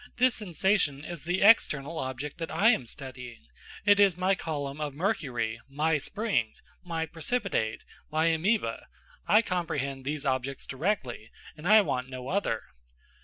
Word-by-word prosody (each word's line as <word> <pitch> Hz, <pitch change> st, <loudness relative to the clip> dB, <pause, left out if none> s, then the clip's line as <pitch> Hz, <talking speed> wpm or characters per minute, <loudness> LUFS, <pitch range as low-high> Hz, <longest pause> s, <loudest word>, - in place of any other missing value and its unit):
this 250 Hz, 0 st, +4 dB
sensation 180 Hz, -7 st, 0 dB
is 170 Hz, -3 st, -7 dB
the 180 Hz, +3 st, +1 dB
external 165 Hz, -8 st, +4 dB
object 130 Hz, +4 st, -5 dB
that 165 Hz, -, -3 dB
I 220 Hz, -, +4 dB
am 130 Hz, -, -1 dB
studying; 125 Hz, -2 st, -9 dB, 0.4 s
it 205 Hz, -1 st, +6 dB
is 195 Hz, -4 st, +5 dB
my 185 Hz, +2 st, +2 dB
column 145 Hz, -5 st, -4 dB
of 145 Hz, -2 st, -3 dB
mercury, 130 Hz, -, -1 dB
my 150 Hz, +2 st, +1 dB
spring, 195 Hz, -, -1 dB, 0.3 s
my 165 Hz, -2 st, -2 dB
precipitate, 165 Hz, -, -1 dB, 0.3 s
my 155 Hz, +1 st, +2 dB
amoeba; 200 Hz, +8 st, 0 dB, 0.4 s
I 215 Hz, +2 st, +6 dB
comprehend 140 Hz, -, -2 dB
these 145 Hz, +2 st, -3 dB
objects 135 Hz, 0 st, -1 dB
directly, 135 Hz, -, -2 dB, 0.3 s
and 155 Hz, +3 st, -6 dB
I 215 Hz, +2 st, +8 dB
want 130 Hz, -9 st, -2 dB
no 130 Hz, 0 st, -7 dB
other." 185 Hz, -, 0 dB
155 Hz, 145 wpm, -28 LUFS, 135-195 Hz, 0.4 s, I